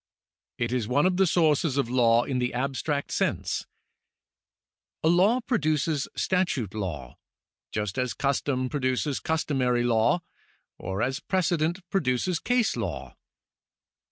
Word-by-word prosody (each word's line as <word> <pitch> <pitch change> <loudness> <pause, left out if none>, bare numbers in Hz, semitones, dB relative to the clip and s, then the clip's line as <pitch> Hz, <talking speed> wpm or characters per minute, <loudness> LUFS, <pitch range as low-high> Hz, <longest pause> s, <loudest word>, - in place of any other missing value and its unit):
It 120 0 -1
is 120 -4 -1
one 140 +6 +2
of 185 -1 +2
the 190 -1 +4
sources 155 -4 +2
of 140 - +1
law 120 -1 +4
in 130 -1 -2
the 125 0 -1
abstract 140 +3 -2
sense. - - -1 1.4
A - - +3
law 195 +9 +4
produces 155 - 0
statute 175 - 0
law, 80 - -5 0.5
just 105 +1 -2
as 125 -4 -1
custom 135 -2 0
produces 130 +1 -1
customary 130 -6 0
law, 120 +8 +2 0.6
or 95 +3 -3
as 130 +2 -1
a - - -28
precedent 175 -1 0
produces 165 0 0
case 245 -2 +1
law. - - -4
140 Hz, 125 wpm, -26 LUFS, 120-170 Hz, 1.4 s, the